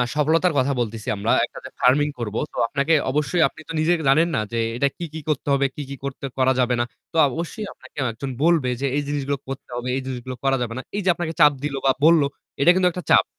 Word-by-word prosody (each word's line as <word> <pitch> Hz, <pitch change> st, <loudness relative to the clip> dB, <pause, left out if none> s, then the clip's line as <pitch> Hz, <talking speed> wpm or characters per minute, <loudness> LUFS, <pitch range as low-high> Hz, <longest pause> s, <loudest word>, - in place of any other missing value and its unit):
সফলতার 160 Hz, +3 st, +2 dB
কথা 140 Hz, +2 st, +1 dB
বলতেছি 110 Hz, -2 st, -3 dB
আমরা 100 Hz, -, 0 dB
একটা -, -, -11 dB
যে -, -, -6 dB
farming 145 Hz, +4 st, +3 dB
করব, 110 Hz, -2 st, -4 dB, 0.2 s
তো -, -, -10 dB
আপনাকে 140 Hz, +6 st, +1 dB, 0.2 s
অবশ্যই 150 Hz, +4 st, +1 dB
আপনি 160 Hz, -, -12 dB
তো -, -, -3 dB
নিজে 165 Hz, +3 st, +3 dB
জানেন 160 Hz, +5 st, +5 dB
না 110 Hz, -, +1 dB
যে 115 Hz, -, 0 dB, 0.2 s
এটা 140 Hz, -, +3 dB
কি, 175 Hz, -, -4 dB
কি, 160 Hz, -, -5 dB
করতে 145 Hz, -1 st, -1 dB
হবে, 140 Hz, 0 st, +2 dB
কি, 150 Hz, -, -5 dB
কি, 140 Hz, -, -5 dB
করতে 140 Hz, 0 st, -5 dB
করা 130 Hz, 0 st, +3 dB
যাবে 125 Hz, 0 st, +2 dB
না। 120 Hz, -, +2 dB, 0.3 s
তো -, -, -2 dB
অবশ্যই 170 Hz, -, -5 dB
আপনাকে -, -, -18 dB
একজন 135 Hz, +5 st, -6 dB
বলবে 165 Hz, -7 st, +3 dB
যে -, -, 0 dB
"এই -, -, +1 dB
জিনিসগুলো 140 Hz, -1 st, -1 dB
করতে 135 Hz, -1 st, -7 dB
হবে, 125 Hz, +1 st, -4 dB
এই -, -, -2 dB
জিনিসগুলো 130 Hz, -1 st, -5 dB
করা 135 Hz, 0 st, +2 dB
যাবে 115 Hz, -1 st, -2 dB
না।" -, -, -3 dB
এই 205 Hz, -, 0 dB
যে -, -, +3 dB
আপনাকে 165 Hz, -2 st, -3 dB
চাপ 150 Hz, -1 st, +8 dB
দিল 145 Hz, -2 st, -2 dB
বা 135 Hz, -, +6 dB
বলল 165 Hz, -2 st, +6 dB, 0.4 s
এটা 175 Hz, -, +7 dB
কিন্তু 185 Hz, -1 st, +3 dB
একটা 180 Hz, 0 st, -6 dB
চাপ। -, -, +6 dB
140 Hz, 240 wpm, -23 LUFS, 130-160 Hz, 0.4 s, চাপ